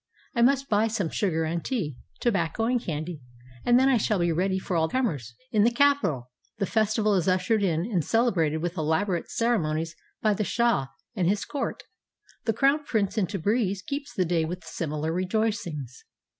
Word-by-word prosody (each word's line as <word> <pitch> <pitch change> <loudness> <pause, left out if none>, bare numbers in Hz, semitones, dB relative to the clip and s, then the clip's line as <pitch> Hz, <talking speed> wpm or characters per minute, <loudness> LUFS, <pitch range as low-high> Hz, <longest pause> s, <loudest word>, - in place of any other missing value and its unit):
I 235 - +1
must 270 +2 +3
buy 215 -1 +3
some 210 -6 -1
sugar 165 -6 0
and 165 +1 -2
tea, 190 - -2 0.3
tobacco 200 -3 0
and 245 0 +1
candy, 160 - -4 0.4
and 240 +1 +5
then 265 - +4
I 265 -2 +4
shall 215 -1 +1
be 175 -1 +1
ready 190 +3 +1
for 185 -1 -3
all 160 -1 +2
comers." 145 - -2 0.2
In 215 -2 +4
the 230 - +5
capital 235 - +2 0.3
the 200 - 0
festival 215 0 +2
is 185 -3 +1
ushered 185 +4 +2
in 170 -5 +1
and 185 -4 0
celebrated 170 -10 +1
with 175 +1 -3
elaborate 165 +3 0
ceremonies 165 -8 0 0.2
by 215 -1 +2
the 210 - -1
shah 235 - +1 0.3
and 180 -4 +1
his 205 +1 0
court. 285 -2 -3 0.6
The 225 - +2
crown 280 +5 +3
prince 210 -8 0
in 205 -5 +1
Tabriz 200 +1 0
keeps 280 +4 -4
the 185 -5 0
day 165 -1 +1
wdth 175 +2 -4
similar 160 -1 -3
rejoicings. 180 - -2
195 Hz, 180 wpm, -26 LUFS, 165-225 Hz, 0.6 s, and